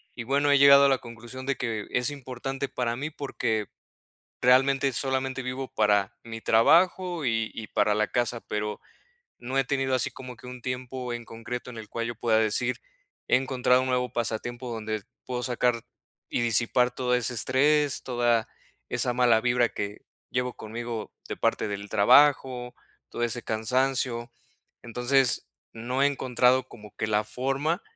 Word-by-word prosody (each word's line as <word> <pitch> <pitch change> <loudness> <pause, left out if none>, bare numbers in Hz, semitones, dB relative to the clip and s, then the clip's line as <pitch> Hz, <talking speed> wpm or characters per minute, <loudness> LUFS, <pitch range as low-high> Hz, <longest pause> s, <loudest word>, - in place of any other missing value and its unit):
Y 115 - -5
bueno, 140 +3 +2
he 140 - +6
llegado 140 0 +8
a - - +5
la 135 - +3
conclusión 120 +2 -9
de 140 0 0
que 110 -4 -3
es 125 +2 +1
importante 135 0 -5
para 120 -2 -2
mí 145 +4 -3
porque 110 -7 -2 0.8
realmente 135 +2 +4
solamente 130 0 -1
vivo 130 +1 -4
para 105 -2 +2
mi 115 -1 -7
trabajo 175 +7 +3
y 115 -3 0
y 110 - -7
para 105 - +2
la 105 0 +1
casa, 120 -1 -1
pero 105 -1 -4 0.6
no 130 +3 -5
he 135 - +3
tenido 135 -1 0
así 125 - 0
como 125 -2 -10
que 125 - -14
un 125 0 -8
tiempo 125 0 -4
en 120 0 -6
concreto 120 +2 -7
en 115 - -9
el 110 -2 -9
cual 115 0 -3
yo 120 - -4
pueda 110 -2 +2
decir: 110 -1 +1 0.5
"He - - +5
encontrado 130 -1 +2
un 130 - -2
nuevo 125 0 0
pasatiempo 120 +2 -3
donde 110 -2 -4 0.2
puedo 125 -1 -3
sacar 120 -1 0 0.5
y - - 0
disipar 120 +2 +2
todo 125 0 0
ese 125 0 0
estrés, 145 +4 +2
toda 120 -3 +1 0.4
esa 125 - +1
mala 120 -2 +4
vibra 120 0 +2
que 100 +1 -5 0.3
llevo 125 0 -1
conmigo 115 0 -6 0.2
de - - -4
parte - - 0
del 100 0 -5
trabajo, 125 +2 +4 0.4
todo 120 - -4
ese 120 0 -2
cansancio". 120 +1 0 0.5
Entonces, 125 - +1 0.2
no 125 +4 -2
he - - +6
encontrado 130 -2 +2
como 105 -2 -13
que - - -1
la 105 0 +1
forma 135 - -1
125 Hz, 165 wpm, -27 LUFS, 115-130 Hz, 0.8 s, llegado